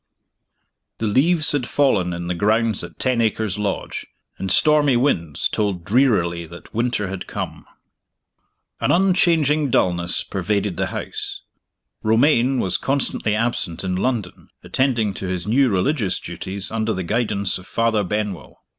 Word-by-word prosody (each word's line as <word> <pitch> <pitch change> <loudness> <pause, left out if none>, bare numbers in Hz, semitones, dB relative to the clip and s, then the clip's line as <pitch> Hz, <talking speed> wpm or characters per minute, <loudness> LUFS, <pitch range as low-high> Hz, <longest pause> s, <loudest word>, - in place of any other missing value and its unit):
THE 115 - -2
leaves 150 +9 +4
had 140 -4 -1
fallen 105 -11 +2
in 85 0 -4
the 90 - -1
grounds 110 +3 +1
at - - -10
Ten 125 -3 +1
Acres 110 -2 -1
Lodge, 100 -2 -3 0.3
and 95 - -3
stormy 145 +2 +4
winds 85 - 0
told 100 -5 -2
drearily 95 -9 +2
that 85 +2 -13
winter 115 -3 0
had 95 -1 -6
come. - - -6 1.1
An - - 0
unchanging 165 -6 +3
dullness 85 -5 +1
pervaded 100 0 -1
the - - -1
house. - - -5 0.6
Romayne 125 +3 +3
was 95 -4 0
constantly 135 -5 0
absent 110 -7 -1
in 90 -1 -1
London, 105 -2 -2
attending 120 -6 0
to 95 - -5
his 90 -1 -3
new 130 +5 +3
religious 105 - 0
duties 100 +1 -6
under 110 0 -1
the 95 - -3
guidance 100 -2 0
of 95 - -14
Father 115 -2 +1
Benwell. 100 -3 -4
110 Hz, 140 wpm, -21 LUFS, 95-130 Hz, 1.1 s, leaves